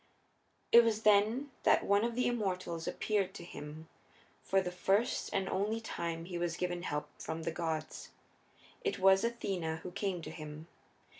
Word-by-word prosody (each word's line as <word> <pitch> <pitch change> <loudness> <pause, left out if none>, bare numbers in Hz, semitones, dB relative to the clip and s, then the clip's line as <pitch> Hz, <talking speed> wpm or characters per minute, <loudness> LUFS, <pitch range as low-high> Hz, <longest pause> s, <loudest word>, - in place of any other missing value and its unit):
It 235 0 +9
was 220 -1 0
then 215 +7 +4
that - - +4
one 200 +1 +4
of 235 0 -1
the 250 - +1
immortals 185 -8 -1
appeared 200 -3 0
to - - -7
him; 155 -1 -9 0.5
for 195 - +2
the 180 -2 -2
first 195 +6 +1
and 195 -1 0
only 210 +4 0
time 170 -6 -4
he 175 -1 -4
was 170 -1 -1
given 175 -1 -2
help 150 -4 -3
from 160 0 -4
the 165 - -1
gods. 160 -1 -3 0.7
It 415 - 0
was 190 +1 +5
Athena 185 -9 -2
who 180 - -6
came 190 -3 -2
to 155 - -6
him. 155 -1 -8
185 Hz, 165 wpm, -33 LUFS, 165-210 Hz, 0.7 s, It